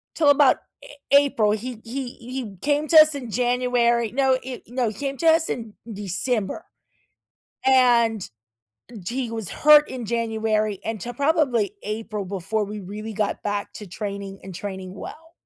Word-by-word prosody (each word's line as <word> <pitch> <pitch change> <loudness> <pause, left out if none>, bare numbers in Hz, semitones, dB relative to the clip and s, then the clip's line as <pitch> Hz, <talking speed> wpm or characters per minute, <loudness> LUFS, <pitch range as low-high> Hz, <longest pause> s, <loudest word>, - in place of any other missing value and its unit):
till 305 -3 +4
about 285 -2 +5 0.3
A 290 - -12 0.2
April. 280 -7 +4
He 225 +2 -4
he 250 +2 -4
he 245 -5 -7
came 295 +1 +1
to 320 - +9
us 310 -1 +6
in 250 -5 -6
January 245 -1 +1
no, 265 0 +2
he 255 -1 -8
no 245 -1 -1
he - - -7
came 275 +1 -4
to 330 - 0
us 320 0 +4
in 225 -3 -4 0.2
December, 205 - -2 1.0
and 240 -5 +4 0.7
g 245 +9 -3
he - - -8
was 225 -6 -4
hurt 300 0 +6
in 245 -4 -6
January 220 -3 0
until 225 +2 -4
probably 280 - +1
April 215 -1 -4
before 200 +3 -2
we 210 +1 -6
really 210 +3 -7
got 210 -1 -2
back 205 0 -3
to 210 - -8
training 200 +1 -6
and 190 -2 -9
training 190 -1 -6
well. 325 +10 -10
230 Hz, 160 wpm, -23 LUFS, 210-265 Hz, 1.0 s, to